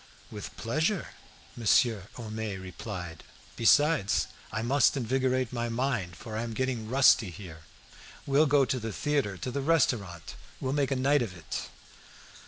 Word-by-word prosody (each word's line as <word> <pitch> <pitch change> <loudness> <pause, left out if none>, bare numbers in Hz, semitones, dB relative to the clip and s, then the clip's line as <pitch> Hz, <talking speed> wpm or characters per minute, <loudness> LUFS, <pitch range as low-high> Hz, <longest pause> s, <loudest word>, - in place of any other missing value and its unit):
"With - - -8
pleasure!" 155 - -1 0.5
Monsieur 110 -3 +2
Homais 110 -4 -5
replied; 90 -2 -7 0.3
"besides, 145 -2 +3 0.3
I 110 - -2
must 135 +3 +3
invigorate 130 0 0
my 120 -1 -2
mind, 115 -8 -1
for 110 +5 -8
I 110 - -1
am 115 -1 -5
getting 125 -4 -2
rusty 130 -5 +5
here. 85 -3 -11 0.6
We'll 145 +3 +4
go 140 -1 +4
to 130 +1 -1
the 115 -1 -4
theatre, 140 -6 -1
to 125 - -4
the 140 +2 -2
restaurant; 120 - 0 0.3
we'll 130 0 -2
make 140 -2 +1
a 135 - 0
night 140 +2 +3
of 95 -7 -4
it." 80 - -5
120 Hz, 150 wpm, -29 LUFS, 105-135 Hz, 0.6 s, rusty